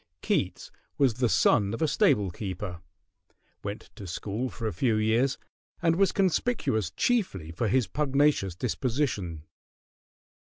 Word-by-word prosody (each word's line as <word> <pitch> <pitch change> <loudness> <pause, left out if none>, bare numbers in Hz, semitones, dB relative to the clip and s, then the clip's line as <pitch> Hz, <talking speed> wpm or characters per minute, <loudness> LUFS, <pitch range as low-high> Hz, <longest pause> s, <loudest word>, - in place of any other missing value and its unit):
Keats - - -1 0.3
was 135 -4 +3
the 125 -3 +3
son 100 -1 +3
of - - -8
a - - +3
stable 105 - +3
keeper, 90 -1 -5 0.8
went 100 +1 -6
to 100 - -8
school 105 +8 -3
for 115 - -7
a 105 - -2
few 115 +6 +1
years, 115 +5 +2 0.4
and 165 -2 +2
was 195 +2 +3
conspicuous 185 - +1
chiefly 95 - 0
for 110 +8 -1
his 125 +3 +2
pugnacious 140 - +1
disposition. 115 - -2
115 Hz, 130 wpm, -28 LUFS, 95-140 Hz, 0.8 s, was